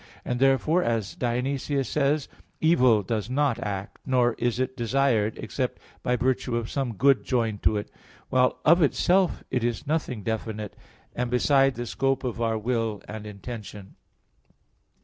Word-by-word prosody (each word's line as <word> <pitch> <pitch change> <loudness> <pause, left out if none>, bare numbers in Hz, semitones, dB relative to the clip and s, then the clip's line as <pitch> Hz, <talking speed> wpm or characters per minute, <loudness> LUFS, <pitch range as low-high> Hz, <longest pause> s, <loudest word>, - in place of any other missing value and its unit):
And 125 0 -2
therefore, 135 +6 +3
as 115 - -1
Dionysius 130 +3 -1
says 145 0 +1
(Div. - - -27
Nom. - - -25
iv): - - -28 0.2
"Evil 115 -5 +5
does 110 +1 -2
not 135 -2 +1
act, 100 -2 -5
nor 125 -2 +2
is 120 0 0
it 130 0 -1
desired, 120 -3 +1
except - - -3 0.2
by 125 - +1
virtue 125 0 0
of 115 -1 -4
some 130 -5 -2
good 130 -1 +4
joined 115 -5 -1
to 110 - +2
it: 105 - -5 0.4
while 125 0 +3
of 170 +3 +6
itself 180 +4 +2
it 125 - 0
is 120 +4 -2
nothing 140 -8 -2
definite, 110 -1 -4 0.4
and 125 0 -1
beside 135 +2 +3
the 120 - -4
scope 135 +2 0
of 120 -2 -3
our 115 -1 +1
will 115 -2 -2
and 105 0 -7
intention." 105 -1 -8
120 Hz, 165 wpm, -26 LUFS, 110-135 Hz, 0.4 s, of